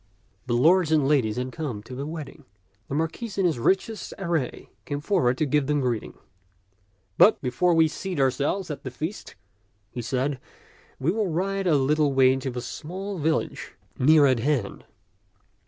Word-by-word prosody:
The 120 Hz, -, +1 dB
lords 165 Hz, +4 st, +4 dB
and 150 Hz, -4 st, +3 dB
ladies 130 Hz, -8 st, +2 dB
had 125 Hz, +1 st, -3 dB
come 125 Hz, -9 st, -5 dB
to 125 Hz, -, -10 dB
the 140 Hz, +3 st, -5 dB
wedding. 155 Hz, -2 st, -8 dB, 0.4 s
The 140 Hz, -, -4 dB
Marquis 165 Hz, +8 st, -3 dB
in 190 Hz, -, +2 dB
his 160 Hz, -8 st, +1 dB
richest 195 Hz, -, 0 dB
array 170 Hz, -9 st, -3 dB
came 145 Hz, -1 st, -4 dB
forward 145 Hz, -7 st, +1 dB
to 155 Hz, -, +1 dB
give 145 Hz, -1 st, +1 dB
them 150 Hz, 0 st, +1 dB
greeting. 125 Hz, -4 st, -2 dB, 1.0 s
But 215 Hz, -, +7 dB
before 150 Hz, +8 st, +2 dB
we 160 Hz, -1 st, +5 dB
seat 180 Hz, +1 st, -5 dB
ourselves 140 Hz, +7 st, 0 dB
at 145 Hz, -, -6 dB
the 130 Hz, -, -5 dB
feast," 160 Hz, +10 st, -6 dB, 0.6 s
he 120 Hz, -, -5 dB
said, 130 Hz, +3 st, -1 dB, 0.3 s
" -, -, -29 dB
we 140 Hz, +6 st, +1 dB
will 210 Hz, 0 st, 0 dB
ride 190 Hz, +3 st, -1 dB
a 160 Hz, -, +4 dB
little 145 Hz, +1 st, +2 dB
way 130 Hz, -1 st, +5 dB
to 135 Hz, 0 st, -3 dB
the 125 Hz, -1 st, -5 dB
small 185 Hz, +9 st, -6 dB
village 155 Hz, +1 st, -2 dB, 0.3 s
near 150 Hz, +2 st, +6 dB
at 130 Hz, -3 st, +3 dB
hand." 125 Hz, -5 st, -1 dB
150 Hz, 170 wpm, -25 LUFS, 130-170 Hz, 1.0 s, But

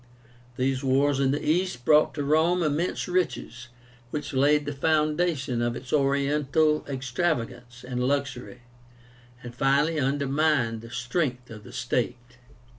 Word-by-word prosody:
These 130 Hz, +1 st, 0 dB
wars 135 Hz, +1 st, +2 dB
in 135 Hz, -1 st, +2 dB
the 145 Hz, +2 st, -2 dB
East 155 Hz, -6 st, 0 dB
brought 155 Hz, 0 st, +4 dB
to 145 Hz, -, -2 dB
Rome 160 Hz, +5 st, +2 dB
immense 155 Hz, +4 st, -1 dB
riches, 155 Hz, -9 st, -2 dB, 0.4 s
which 150 Hz, +2 st, -5 dB
laid 145 Hz, +2 st, +3 dB
the 145 Hz, -, -3 dB
foundation 150 Hz, -3 st, 0 dB
of 120 Hz, 0 st, -1 dB
its 130 Hz, -, -8 dB
Oriental 145 Hz, +2 st, +2 dB
extravagance 125 Hz, -3 st, -3 dB
and 125 Hz, -1 st, -2 dB
luxury, 135 Hz, -2 st, -2 dB, 0.8 s
and 120 Hz, -1 st, -8 dB
finally 140 Hz, +5 st, +2 dB
undermined 140 Hz, -3 st, +1 dB
the 115 Hz, -, -11 dB
strength 125 Hz, +1 st, -2 dB
of 110 Hz, -2 st, -10 dB
the -, -, -12 dB
state. 120 Hz, 0 st, -3 dB
140 Hz, 130 wpm, -26 LUFS, 125-150 Hz, 0.8 s, brought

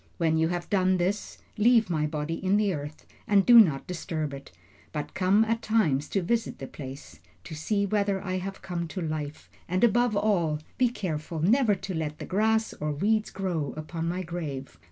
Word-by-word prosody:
When 160 Hz, -2 st, +2 dB
you 160 Hz, 0 st, +2 dB
have 175 Hz, 0 st, -3 dB
done 185 Hz, -2 st, +2 dB
this, 190 Hz, +4 st, -2 dB, 0.2 s
leave 230 Hz, 0 st, +5 dB
my 155 Hz, -3 st, 0 dB
body 150 Hz, +2 st, -4 dB
in 190 Hz, +2 st, +3 dB
the 205 Hz, -2 st, +2 dB
earth 150 Hz, 0 st, -7 dB, 0.2 s
and 200 Hz, -2 st, +4 dB
do 240 Hz, -1 st, +9 dB
not 155 Hz, -11 st, +4 dB
disturb 160 Hz, -4 st, -4 dB
it, 140 Hz, 0 st, -9 dB, 0.4 s
but 150 Hz, -2 st, -5 dB
come 195 Hz, +4 st, +3 dB
at 230 Hz, +1 st, -1 dB
times 155 Hz, -12 st, +1 dB
to 195 Hz, -, 0 dB
visit 230 Hz, +4 st, -1 dB
the 135 Hz, -, -6 dB
place, 130 Hz, -, -9 dB, 0.2 s
to -, -, -9 dB
see 200 Hz, +7 st, 0 dB
whether 200 Hz, -1 st, 0 dB
I 185 Hz, -1 st, -3 dB
have 195 Hz, +1 st, -7 dB
come 170 Hz, -2 st, -3 dB
to 185 Hz, +3 st, -5 dB
life, 155 Hz, -2 st, -4 dB, 0.2 s
and 185 Hz, +4 st, 0 dB
above 240 Hz, 0 st, +3 dB
all 175 Hz, -8 st, +1 dB, 0.2 s
be 250 Hz, -1 st, +4 dB
careful 165 Hz, -7 st, -4 dB
never 220 Hz, +2 st, +4 dB
to 190 Hz, 0 st, -6 dB
let 155 Hz, -2 st, -3 dB
the -, -, -7 dB
grass 220 Hz, +3 st, +1 dB
or 150 Hz, 0 st, -3 dB
weeds 215 Hz, +8 st, +1 dB
grow 175 Hz, -7 st, -3 dB
upon 165 Hz, +1 st, -4 dB
my 180 Hz, +2 st, -2 dB
grave. 155 Hz, -6 st, -6 dB
180 Hz, 195 wpm, -27 LUFS, 155-205 Hz, 0.4 s, do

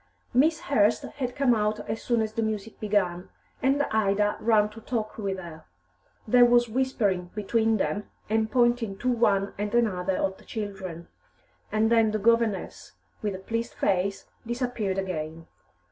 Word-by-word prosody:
Miss 305 Hz, +6 st, +3 dB
Hurst 220 Hz, -6 st, +2 dB
had 250 Hz, -3 st, -5 dB
come 275 Hz, -3 st, +3 dB
out 215 Hz, -1 st, -1 dB
as 225 Hz, -, -3 dB
soon 235 Hz, -2 st, +1 dB
as 215 Hz, 0 st, -4 dB
the 230 Hz, -, -1 dB
music 220 Hz, -1 st, -3 dB
began, 190 Hz, -4 st, 0 dB, 0.3 s
and 275 Hz, +2 st, +3 dB
Ida 210 Hz, -1 st, +2 dB
ran 215 Hz, -2 st, +3 dB
to 220 Hz, +2 st, -12 dB
talk 220 Hz, -2 st, -3 dB
with 195 Hz, -2 st, -2 dB
her. 170 Hz, -3 st, -10 dB, 0.6 s
There 245 Hz, +3 st, +6 dB
was 240 Hz, 0 st, +5 dB
whispering 215 Hz, -7 st, 0 dB
between 220 Hz, +1 st, +1 dB
them, 205 Hz, +1 st, -2 dB, 0.2 s
and 220 Hz, +1 st, +1 dB
pointing 240 Hz, -5 st, +2 dB
to 250 Hz, +4 st, 0 dB
one 205 Hz, -5 st, +2 dB
and 210 Hz, +2 st, -2 dB
another 190 Hz, -5 st, +1 dB
of 190 Hz, 0 st, -1 dB
the -, -, -17 dB
children, 190 Hz, -6 st, -6 dB, 0.6 s
and 215 Hz, +1 st, +2 dB
then 225 Hz, -2 st, +5 dB
the 215 Hz, -, 0 dB
governess, 230 Hz, -1 st, 0 dB, 0.3 s
with 205 Hz, -2 st, -2 dB
a -, -, -5 dB
pleased 230 Hz, +5 st, -4 dB
face, 195 Hz, 0 st, 0 dB, 0.2 s
disappeared 240 Hz, -5 st, -2 dB
again. 165 Hz, -4 st, -4 dB
215 Hz, 160 wpm, -27 LUFS, 195-235 Hz, 0.6 s, There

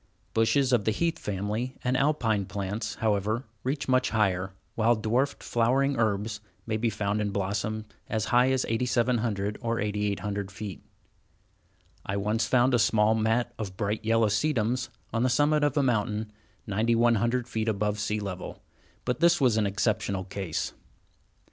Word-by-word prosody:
Bushes 125 Hz, +4 st, +3 dB
of 115 Hz, -4 st, +3 dB
the -, -, +3 dB
heath 165 Hz, +9 st, 0 dB
family 105 Hz, +6 st, -3 dB
and 125 Hz, 0 st, +1 dB
Alpine 125 Hz, -8 st, +1 dB
plants, 100 Hz, +2 st, -3 dB
however, 110 Hz, +2 st, 0 dB, 0.2 s
reach 140 Hz, +3 st, -2 dB
much 130 Hz, -1 st, +3 dB
higher, 95 Hz, -4 st, +1 dB, 0.2 s
while 115 Hz, +1 st, +3 dB
dwarfed 120 Hz, +6 st, 0 dB
flowering 130 Hz, +4 st, +2 dB
herbs 105 Hz, -2 st, 0 dB, 0.3 s
may 110 Hz, -, -1 dB
be 115 Hz, +1 st, +1 dB
found 105 Hz, -1 st, -1 dB
in 105 Hz, -, 0 dB
blossom 100 Hz, +2 st, -2 dB, 0.2 s
as 110 Hz, -1 st, 0 dB
high 125 Hz, +2 st, +5 dB
as 130 Hz, -1 st, +1 dB
8700 115 Hz, -3 st, 0 dB
or 115 Hz, -1 st, -1 dB
8800 105 Hz, -1 st, -2 dB
feet. 100 Hz, 0 st, -7 dB, 1.2 s
I 100 Hz, -, -2 dB
once 105 Hz, +3 st, 0 dB
found 130 Hz, +1 st, +3 dB
a 120 Hz, -, +4 dB
small 110 Hz, 0 st, +4 dB
mat 115 Hz, +2 st, +1 dB
of 95 Hz, -4 st, -5 dB
bright 105 Hz, +1 st, -1 dB
yellow 115 Hz, 0 st, +3 dB
sedums 120 Hz, +1 st, 0 dB, 0.2 s
on 115 Hz, -, +1 dB
the 130 Hz, -, +3 dB
summit 145 Hz, +4 st, +3 dB
of 145 Hz, 0 st, +1 dB
a 145 Hz, -, +4 dB
mountain, 110 Hz, -3 st, 0 dB, 0.3 s
9100 115 Hz, +3 st, +2 dB
feet 110 Hz, -1 st, -2 dB
above 105 Hz, 0 st, -1 dB
sea 105 Hz, +1 st, -1 dB
level, 100 Hz, -3 st, -6 dB, 0.4 s
but 125 Hz, -1 st, -1 dB
this 170 Hz, +1 st, +4 dB
was 125 Hz, -6 st, +4 dB
an 110 Hz, -2 st, +2 dB
exceptional 100 Hz, -1 st, 0 dB
case. 95 Hz, -3 st, -3 dB
110 Hz, 155 wpm, -28 LUFS, 105-125 Hz, 1.2 s, high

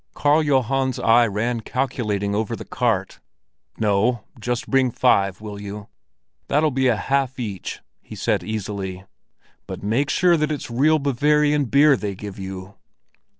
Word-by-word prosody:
Karl 145 Hz, +2 st, +3 dB
Johan's 135 Hz, -2 st, +1 dB
eye 115 Hz, +1 st, +4 dB
ran 115 Hz, +4 st, -1 dB
calculating 110 Hz, -5 st, -2 dB
over 110 Hz, +2 st, -1 dB
the -, -, -9 dB
cart. 110 Hz, -6 st, -1 dB, 0.6 s
"No; 110 Hz, +2 st, +1 dB, 0.2 s
just 125 Hz, +5 st, -2 dB
bring 135 Hz, -2 st, +3 dB
five, 100 Hz, -6 st, +2 dB
will 105 Hz, -1 st, -7 dB
you? 105 Hz, 0 st, -8 dB, 0.6 s
That'll 150 Hz, +2 st, +2 dB
be 130 Hz, 0 st, +1 dB
a 120 Hz, -, +3 dB
half 135 Hz, +4 st, -1 dB
each," 105 Hz, -6 st, -5 dB, 0.2 s
he -, -, -11 dB
said -, -, 0 dB
easily. 100 Hz, -3 st, -5 dB, 0.6 s
"But -, -, -7 dB
make 120 Hz, +8 st, 0 dB
sure 175 Hz, 0 st, +3 dB
that 150 Hz, 0 st, 0 dB
it's 145 Hz, -5 st, -5 dB
real 150 Hz, +6 st, +3 dB
Bavarian 150 Hz, +1 st, +2 dB
beer 140 Hz, +4 st, +5 dB
they 105 Hz, -5 st, -4 dB
give 100 Hz, 0 st, -8 dB
you." 95 Hz, +1 st, -8 dB
120 Hz, 150 wpm, -22 LUFS, 105-140 Hz, 0.6 s, beer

